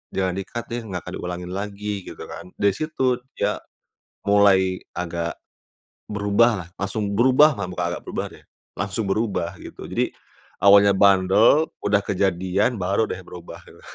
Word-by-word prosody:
jangan 95 -1 +1
di-cut 120 +4 -5
deh, 120 - -2
nggak 90 -3 -6
diulangin 90 0 -5
lagi 105 0 -6 0.2
gitu - - -8
kan, - - -8
di 100 - +3
situ 130 -5 0 0.2
dia 105 +1 -1 0.6
mulai 95 -2 +4 0.2
agak 85 -2 -3 0.7
berubahlah, 100 -2 +1
langsung 100 +1 -2
berubah 130 +7 +6
mah, 95 - -2
bukan 90 - -1
agak - - -6
berubah - - -3
deh, - - -16 0.3
langsung 100 +3 -2
berubah 100 -3 -1
gitu. - - -11
Jadi, - - 0 0.6
awalnya 100 0 +7
bandel, 100 +10 +5 0.2
udah 100 0 +3
kejadian 95 +2 +1
baru 100 +5 +1
deh 95 - -5
berubah 90 -1 -11
gitu. - - -16
100 Hz, 140 wpm, -23 LUFS, 95-105 Hz, 0.7 s, awalnya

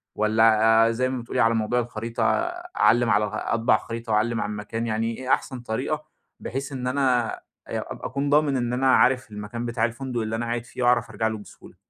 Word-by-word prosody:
والّا 110 +1 +4
آآ - - +1
زي 130 +3 0
ما 130 -1 -3
بتقولي، 120 - -4
على 115 +2 +4
موضوع 115 +2 +1
الخريطة 115 -1 -3 0.5
أعلّم 120 0 +4
على 105 -1 +3
أطبع 115 +3 +1
الخريطة 115 0 -5
وأعلّم 115 +2 +1
على 105 - -2
المكان 105 +2 -4
يعني 115 +1 -1
إيه 130 0 -7
أحسن 130 - -2
طريقة، 110 -2 -3 0.3
بحيث 135 +3 -5
إن 125 -2 -4
أنا 125 -3 +1
أ - - -16 0.3
أبقى - - -5
أكون 140 +3 -2
ضامن 145 -2 +3
إن 120 -1 -1
أنا 130 +1 +3
عارف 130 -2 +3
المكان 105 +3 -6
بتاع 120 -1 0
الفندق 120 +1 -3
اللي 110 0 -2
أنا 120 +1 -2
قاعد 120 0 -3
فيه 125 +1 -5
وأعرف 120 -1 +3
أرجع 110 0 -1
له 110 0 -3
بسهولة؟ 105 - -14
115 Hz, 200 wpm, -24 LUFS, 110-125 Hz, 0.5 s, والّا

